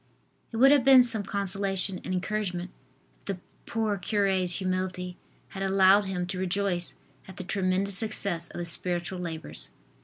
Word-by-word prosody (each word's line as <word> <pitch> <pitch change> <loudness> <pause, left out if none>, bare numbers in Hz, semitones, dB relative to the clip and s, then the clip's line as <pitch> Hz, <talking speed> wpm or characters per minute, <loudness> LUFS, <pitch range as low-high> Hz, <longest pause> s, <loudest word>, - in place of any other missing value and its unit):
It 225 - -5
would 270 +4 +7
have 285 -3 +5
been 260 -1 +8
some 230 -3 +2
consolation 195 -1 0
and - - -5
encouragement 185 -1 -3 0.5
if - - -30
the 195 -2 -3 0.3
poor 220 -3 -1
cure's 190 -2 +1
humility 185 -1 -3 0.3
had 195 - -8
allowed 195 +1 +4
him 180 -2 -3
to 185 +1 -5
rejoice 185 -1 0 0.3
at 190 -1 -12
the 185 - -5
tremendous 190 0 0
success 200 -6 0
of - - -10
his 175 -1 0
spiritual 175 +1 -2
labors. 165 -3 -5
190 Hz, 155 wpm, -27 LUFS, 180-200 Hz, 0.5 s, been